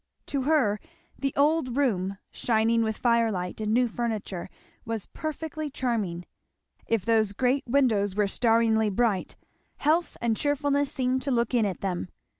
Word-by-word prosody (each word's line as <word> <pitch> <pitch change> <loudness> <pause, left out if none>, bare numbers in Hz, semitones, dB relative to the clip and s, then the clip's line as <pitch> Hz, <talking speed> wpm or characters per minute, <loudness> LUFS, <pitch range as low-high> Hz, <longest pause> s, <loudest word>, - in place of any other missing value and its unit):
To 275 - -2
her 255 -8 +2 0.4
the 275 -1 0
old 285 -3 +2
room, 200 -8 0
shining 230 0 +2
with 220 -1 -1
firelight 225 -6 +1
and 215 0 -1
new 245 +2 +3
furniture, 220 -6 -3 0.3
was 225 -3 -4
perfectly 310 0 -5
charming. 215 -10 -2 0.6
If 225 -5 0
those 220 -3 +2
great 260 +5 +1
windows 225 -7 +2
were 210 -1 +2
staringly 225 0 +3
bright, 205 -2 0 0.4
health 320 +4 +1
and 230 -2 +1
cheerfulness 285 +1 0
seemed 260 0 0
to 280 - -3
look 235 -2 +1
in 230 -4 +3
at 190 - -5
them. 180 - -2
230 Hz, 145 wpm, -27 LUFS, 210-275 Hz, 0.6 s, new